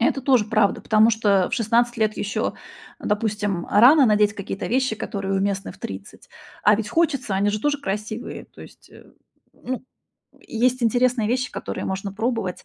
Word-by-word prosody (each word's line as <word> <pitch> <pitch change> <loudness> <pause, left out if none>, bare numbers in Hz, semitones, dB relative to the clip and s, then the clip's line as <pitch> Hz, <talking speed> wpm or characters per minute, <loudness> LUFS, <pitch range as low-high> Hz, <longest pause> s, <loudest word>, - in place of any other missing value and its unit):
Это 245 +4 +1
тоже 255 -4 +3
правда, 215 -1 +1
потому 220 +1 +4
что 205 -4 +2
в - - 0
16 240 +1 +1
лет 215 -1 0
ещё, 210 +2 -2 0.4
а - - -8
допустим, 205 -4 -1
рано 260 +6 +6
надеть 210 -1 +3
какие-то 195 -1 -5
вещи, 255 -1 0
которые 195 -2 -3
уместны 195 0 -1
в - - -19
30. 95 0 -9 0.3
А 210 0 +5
ведь 215 -1 -4
хочется, 275 - 0
они 200 +2 +1
же 210 - -2
тоже 290 +1 0
красивые. 215 +1 -5
То - - -18
есть, - - -16
а, - - -16
м. - - -17 0.5
Ну, 260 - -2 0.6
м, - - -25
есть 250 +2 0
интересные 245 0 +2
вещи, 250 0 -1
которые - - -5
можно 190 +1 -4
пробовать. 220 -4 -3
215 Hz, 180 wpm, -22 LUFS, 200-245 Hz, 0.6 s, рано